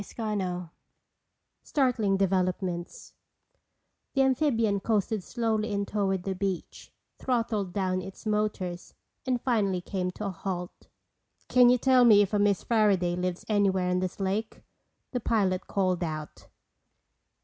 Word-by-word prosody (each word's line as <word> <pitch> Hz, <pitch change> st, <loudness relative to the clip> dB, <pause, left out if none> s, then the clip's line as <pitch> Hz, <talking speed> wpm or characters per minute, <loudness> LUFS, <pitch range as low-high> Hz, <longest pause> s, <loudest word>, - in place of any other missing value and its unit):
CHAPTER 215 Hz, 0 st, -4 dB
VI 180 Hz, -2 st, -3 dB, 0.9 s
Startling 235 Hz, -8 st, +1 dB
Developments 185 Hz, -2 st, -1 dB, 1.0 s
The 270 Hz, -, +4 dB
amphibian 240 Hz, -6 st, +2 dB
coasted 215 Hz, 0 st, 0 dB
slowly 225 Hz, -1 st, -1 dB
in 200 Hz, 0 st, -1 dB
toward 195 Hz, -3 st, -1 dB
the 195 Hz, -, -2 dB
beach, 190 Hz, -2 st, -4 dB, 0.3 s
throttled 225 Hz, -6 st, -1 dB
down 185 Hz, -1 st, -1 dB
its 190 Hz, +4 st, -10 dB
motors 210 Hz, -4 st, -2 dB, 0.3 s
and 250 Hz, -1 st, +1 dB
finally 210 Hz, -7 st, +1 dB
came 180 Hz, 0 st, -3 dB
to 215 Hz, -, -6 dB
a 200 Hz, -, -2 dB
halt. 180 Hz, -1 st, -6 dB, 0.6 s
"Can 250 Hz, -1 st, +6 dB
you 250 Hz, -, +5 dB
tell 255 Hz, 0 st, +4 dB
me 210 Hz, -4 st, +7 dB
if 200 Hz, -, -5 dB
a 205 Hz, -, +2 dB
Miss 205 Hz, -2 st, +2 dB
Fairaday 200 Hz, -6 st, +2 dB
lives 180 Hz, 0 st, -3 dB
anywhere 190 Hz, -4 st, +2 dB
on 180 Hz, -, +1 dB
this 185 Hz, +1 st, -4 dB
lake?" 200 Hz, +3 st, -2 dB, 0.5 s
the 250 Hz, -, -1 dB
pilot 200 Hz, -5 st, 0 dB
called 185 Hz, -3 st, 0 dB
out. 155 Hz, -2 st, -6 dB
200 Hz, 135 wpm, -28 LUFS, 185-220 Hz, 1.0 s, me